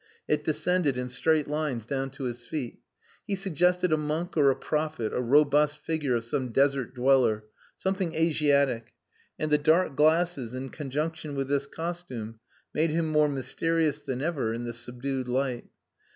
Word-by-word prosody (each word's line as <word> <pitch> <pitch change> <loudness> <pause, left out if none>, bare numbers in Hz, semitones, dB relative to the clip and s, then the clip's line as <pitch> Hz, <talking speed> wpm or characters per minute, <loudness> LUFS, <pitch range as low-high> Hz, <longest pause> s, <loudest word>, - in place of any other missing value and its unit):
It - - +1
descended 180 -8 +1
in 125 0 -3
straight 150 +4 +1
lines 150 -6 -2
down 135 +2 -2
to 135 - -7
his 120 -2 -5
feet. 135 -7 -4 0.5
He 200 - 0
suggested 180 -2 +2
a - - +4
monk 155 +4 -2
or 145 -3 +5
a 135 - +3
prophet, 150 -7 -2
a - - 0
robust 145 +3 +4
figure 150 -7 -1
of 115 -1 -2
same 130 0 -2
desert 135 0 +1
dweller 125 -4 +3 0.3
something 190 -3 -1
Asiatic; 145 -7 +2 0.4
and 155 -1 -2
the 150 - +5
dark 160 0 +3
glasses 155 -5 +2
in 130 +1 -5
conjunction 150 +1 -3
with 135 -1 -2
this 140 0 0
costume 140 -10 -6 0.3
made 160 +2 +2
him 160 +1 0
more 150 -1 +4
mysterious 150 +2 0
than 130 -2 -4
ever 140 -9 -1
in 120 - -4
the 120 0 -4
subdued 125 +2 -4
light. 125 -1 -1
145 Hz, 165 wpm, -28 LUFS, 130-160 Hz, 0.5 s, or